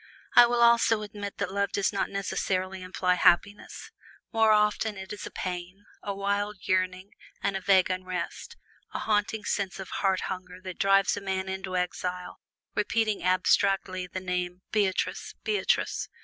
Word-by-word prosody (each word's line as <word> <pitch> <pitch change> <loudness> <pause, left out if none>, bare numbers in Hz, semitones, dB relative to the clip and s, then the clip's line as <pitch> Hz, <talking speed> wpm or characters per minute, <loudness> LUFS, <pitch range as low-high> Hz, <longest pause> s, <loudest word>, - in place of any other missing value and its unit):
I 240 - +9
will 240 0 +2
also 230 -2 +4
admit 205 -1 -7
that - - -2
love 200 0 0
does 200 +1 +1
not 200 - -1
necessarily 190 -1 -2
imply 185 0 0
happiness 180 +3 +1 0.4
more 225 -1 +4
often 210 0 +2
't 190 +1 -7
is 205 - -7
a - - -7
pain, 185 +2 -6 0.2
a 205 - -4
wild 200 +1 -1
yearning, 185 +1 0 0.3
and 200 - 0
a 195 - -2
vague 190 -1 +4
unrest; 185 0 -5 0.4
a - - +1
haunting 210 0 0
sense 195 -3 -2
of 190 - -7
heart 190 -2 +2
hunger 185 -1 -6
that 185 -1 -7
drives 195 0 +4
a - - -4
man 190 -1 -2
into 190 -1 -3
exile 180 0 -3 0.3
repeating 215 0 0
abstractedly 185 0 +2
the 185 - -5
name 180 0 -3
"Beatrice! 200 -3 0
Beatrice!" 420 -1 0
195 Hz, 155 wpm, -28 LUFS, 185-205 Hz, 0.4 s, I